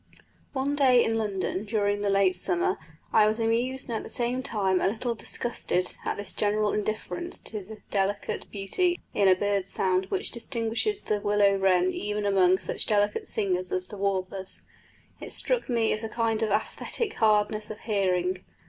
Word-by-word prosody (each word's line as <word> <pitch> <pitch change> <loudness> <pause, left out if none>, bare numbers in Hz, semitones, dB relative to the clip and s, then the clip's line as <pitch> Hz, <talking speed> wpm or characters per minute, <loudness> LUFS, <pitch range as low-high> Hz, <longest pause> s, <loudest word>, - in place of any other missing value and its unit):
One 280 +1 0
day 255 -4 +5
in 225 - 0
London 195 -2 -2
during 205 -1 0
the 205 - 0
late 195 -2 +3
summer 180 0 +1 0.3
I 215 -1 +6
was 215 +1 0
amused 240 +3 0
and 230 -3 -2
at - - -4
the - - -9
same 245 0 0
time 195 -7 0
a - - +3
little 235 +4 -1
disgusted 230 -5 -1
at - - -2
this 205 - -4
general 210 0 +1
indifference 215 +11 -3
to 215 -2 -3
the 215 +3 -12
delicate 200 0 -1
beauty 345 - 0
in 200 - +3
a 185 - +7
bird 200 0 0
sound 185 -1 +2
which - - 0
distinguishes 235 - -1
the 210 - 0
willow 205 -1 +3
wren 185 -1 +3
even 210 +1 -3
among 190 -2 +4
such - - -3
delicate 205 -1 +1
singers 185 -3 -1
as 185 0 -1
the 205 - -8
warblers: 190 -1 -2 0.6
it - - -7
struck - - +1
me 230 -2 +2
as 215 - -3
a 225 - -4
kind 225 -1 0
of 220 - +1
æsthetic 220 - -1
hardness 215 -1 +2
of 215 - -8
hearing. 185 -3 0
210 Hz, 175 wpm, -27 LUFS, 195-225 Hz, 0.6 s, a